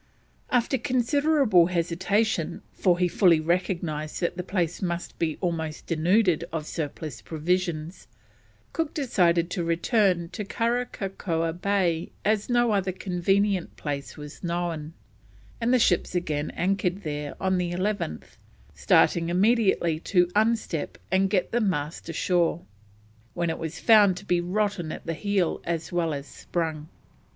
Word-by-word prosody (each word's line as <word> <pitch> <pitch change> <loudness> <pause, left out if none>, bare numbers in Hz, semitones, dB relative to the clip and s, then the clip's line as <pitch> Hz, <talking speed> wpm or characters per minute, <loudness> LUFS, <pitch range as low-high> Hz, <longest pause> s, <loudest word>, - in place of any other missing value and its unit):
After 250 +2 +1
considerable 255 - +3
hesitation, 180 +2 0
for 180 -2 +2
he 180 0 +2
fully 175 -2 +4
recognised 170 -2 -1
that 170 - 0
the 180 - -3
place 175 -2 -2
must 175 -2 -4
be 160 -2 -1
almost 160 -3 -3
denuded 175 +1 +2
of 160 -2 -3
surplus 155 -3 -5
provisions, 170 0 -2 0.7
Cook 325 -1 -2
decided 175 - +2
to 175 - -1
return 170 +1 +1
to 210 - -5
Karakakoa 195 -7 -2
Bay 180 -2 0 0.2
as 210 +1 +1
no 240 -1 +3
other 195 -2 +1
convenient 190 +1 0
place 145 -1 -5
was 150 +3 -10
known, 170 -3 -3 0.7
and 230 +1 +2
the 255 - +5
ships 180 -6 +2
again 155 -4 -1
anchored 190 +1 0
there 150 -2 -4
on 190 -1 +1
the 175 -1 -1
11th, 185 - -3 0.4
starting 165 -1 +3
immediately 190 -4 +2
to 180 +1 +3
unstep 220 -7 0 0.2
and 190 +1 +3
get 185 -2 0
the 240 - +1
mast 160 -5 -2
ashore, 175 0 +1 0.7
when 170 -1 0
it - - -5
was 165 +1 -5
found 205 -5 +6
to 195 - -9
be 175 -2 +2
rotten 185 -2 -1
at - - -8
the 165 - -2
heel 195 0 0
as 165 -1 -3
well 170 -2 0
as 140 -1 -4
sprung. 160 -1 -4
175 Hz, 140 wpm, -26 LUFS, 165-200 Hz, 0.7 s, found